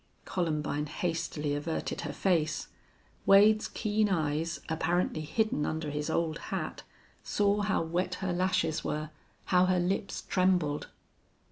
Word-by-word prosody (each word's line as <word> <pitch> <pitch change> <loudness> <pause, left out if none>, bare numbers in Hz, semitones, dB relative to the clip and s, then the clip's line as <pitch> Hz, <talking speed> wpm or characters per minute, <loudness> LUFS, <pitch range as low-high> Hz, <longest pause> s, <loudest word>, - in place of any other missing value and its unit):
Columbine 150 -4 -1
hastily 160 -2 -2
averted 150 +3 -2
her - - -4
face. 165 -5 0 0.6
Wade's 210 +2 +6
keen 215 -1 0
eyes, 160 -1 0
apparently 160 0 0
hidden 155 +1 0
under 155 -1 -2
his 150 +1 -2
old 160 -1 0
hat, - - -3 0.4
saw 205 0 +1
how 200 -4 +1
wet 180 +3 -1
her 185 -1 -2
lashes 175 -3 +1
were, 155 0 -3 0.4
how 180 0 +6
her 185 -1 +3
lips 190 +2 -1
trembled. 180 -6 +1
170 Hz, 125 wpm, -30 LUFS, 155-190 Hz, 0.6 s, Wade's